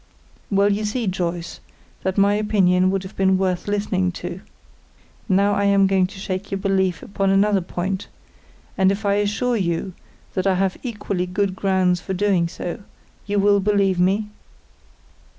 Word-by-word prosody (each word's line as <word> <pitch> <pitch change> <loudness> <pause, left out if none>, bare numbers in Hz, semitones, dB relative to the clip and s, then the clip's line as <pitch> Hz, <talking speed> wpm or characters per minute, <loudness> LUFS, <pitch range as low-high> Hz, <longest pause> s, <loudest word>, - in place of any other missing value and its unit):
"Well, 200 0 +3
you 210 +2 -2
see, 220 +3 -2
Joyce, 175 -3 -3 0.4
that 190 +1 -2
my 200 +1 +4
opinion 190 -3 +2
would 195 0 -1
have 190 - -10
been 190 -1 +3
worth 185 -1 -1
listening 200 -3 0
to. 175 +1 -6 0.9
Now 200 +2 +3
I 200 0 +1
am 200 -1 +4
going 190 -1 +2
to 195 +1 -13
shake 190 0 -4
your 195 - -2
belief 190 -2 0
upon 195 0 -1
another 195 0 +3
point, 185 +2 -3 0.7
and 190 0 +5
if 200 +2 -4
I 200 - +3
assure 230 +4 0
you 180 -1 -2 0.4
that 185 +1 -1
I 190 - +3
have 190 0 0
equally 205 -6 -3
good 190 +1 -1
grounds 185 -2 +1
for 190 - -4
doing 185 -3 +2
so, 170 +3 -6 0.5
you 205 0 -1
will 200 0 +4
believe 200 -2 +2
me?" 200 +4 +1
195 Hz, 165 wpm, -22 LUFS, 185-200 Hz, 0.9 s, and